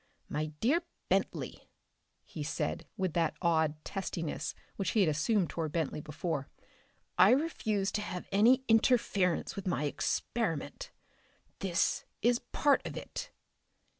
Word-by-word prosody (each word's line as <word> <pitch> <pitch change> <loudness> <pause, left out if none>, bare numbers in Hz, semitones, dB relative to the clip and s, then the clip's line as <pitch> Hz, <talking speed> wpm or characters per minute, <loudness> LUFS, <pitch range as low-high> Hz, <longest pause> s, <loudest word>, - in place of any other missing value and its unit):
"My 155 +1 -1
dear 290 +10 +3 0.3
Bentley," - - -1 0.5
he 155 - -8
said 150 0 -2
with 185 -4 0
that 165 -2 +1
odd 160 -3 +2
testiness 170 -4 -3 0.2
which 195 -2 -1
he - - +6
had 180 - +4
assumed 170 +5 +1
toward 160 -3 -3
Bentley 160 -2 -1
before, 150 -1 -3 0.7
"I - - +9
refuse 220 -8 +1
to 210 - -1
have 180 -3 -5
any 235 +7 +5
interference 220 -6 +3
with 195 -1 -5
my 170 -5 0
experiment. 165 - -2 0.7
This 190 -2 +1 0.2
is 240 +1 +4
part 290 -1 +3
of - - -6
it." - - -6
185 Hz, 130 wpm, -32 LUFS, 160-220 Hz, 0.7 s, I